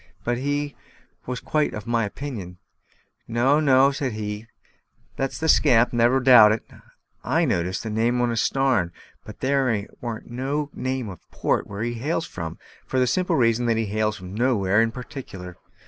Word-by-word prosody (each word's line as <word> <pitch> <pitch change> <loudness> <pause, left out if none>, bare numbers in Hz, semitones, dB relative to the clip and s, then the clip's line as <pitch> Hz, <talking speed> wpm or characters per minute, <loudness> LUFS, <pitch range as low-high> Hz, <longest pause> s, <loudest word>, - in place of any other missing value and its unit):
But 120 0 -1
he 145 +1 -2 0.5
was 125 0 -3
quite 150 -1 0
of 105 - -7
my 115 -1 +1
opinion. 100 -6 -6 0.7
"No, 125 +6 +3
no," 135 -2 +5
said 135 -3 -3
he, 105 0 -5 0.7
"that's 135 0 -2
the 160 - -2
scamp, 125 -7 +4
never 120 +2 +4
a 130 - -2
doubt 120 -5 +8
of - - 0
it. - - -31 0.5
I - - +2
noticed 90 +2 -1
the 110 - -4
name 115 +3 +1
on 120 -1 +1
his 115 0 0
starn; 130 -10 +1 0.3
but - - -12
there 130 -6 +1 0.2
warn't 120 -1 -6
no 140 +4 -2
name 130 -2 -3
of 95 -4 -8
a - - -29
port - - 0
where 100 +2 -5
he 120 0 -2
hails 150 +8 -2
from, 80 -2 -6 0.3
for 130 - -2
the 130 - +4
simple 180 +10 +1
reason 120 -1 +2
that 115 -1 +2
he 115 - 0
hails 105 +1 -1
from 90 0 -9
nowhere 105 -3 +2
in 115 - +2
particular. 105 -8 -8
120 Hz, 185 wpm, -24 LUFS, 105-135 Hz, 0.7 s, doubt